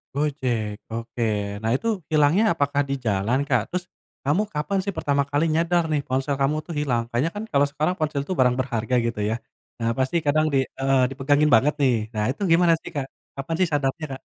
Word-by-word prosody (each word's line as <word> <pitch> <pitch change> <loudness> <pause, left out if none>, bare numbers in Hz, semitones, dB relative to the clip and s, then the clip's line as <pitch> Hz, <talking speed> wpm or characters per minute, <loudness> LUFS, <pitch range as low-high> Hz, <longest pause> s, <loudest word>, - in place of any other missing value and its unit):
Gojek 125 -8 -1 0.2
oke. 115 +1 -4 0.4
Nah 110 +1 0
itu 230 - -5 0.2
hilangnya 155 +7 +4
apakah 145 -2 +1
di - - 0
jalan, 110 +5 +1
Kak? 125 -4 +3
Terus 180 0 -3 0.4
kamu 165 +9 +2
kapan 155 +7 -1
sih 200 -1 -3
pertama 140 0 +1
kali 145 +3 +1
nyadar 170 +1 +2
nih 145 -2 +1
ponsel 135 +2 0
kamu 140 +3 +2
tuh 170 - -6
hilang? 125 -5 +1
Kayaknya 130 +8 0
kan 210 - -4
kalau 140 -1 +4
sekarang 155 +4 0
ponsel 155 -3 -1
tuh 185 - -1
barang 125 -1 +4
berharga 125 -2 -1
gitu 115 -2 -2
ya. 110 - 0 0.4
Nah 115 0 0
pasti 130 +5 0
kadang 155 +2 +3
di - - +4 0.2
heeh 135 0 +3
dipegangin 145 +3 +2
banget 145 +7 +3
nih. 130 -3 +4 0.2
Nah 105 -1 -1
itu 150 - -10
gimana 170 0 +5
sih, - - -8
Kak? 140 -2 -1 0.3
Kapan 150 +4 -3
sih 185 - +4
sadarnya, 145 +2 0
Kak? 135 - -8
140 Hz, 200 wpm, -24 LUFS, 125-155 Hz, 0.4 s, gimana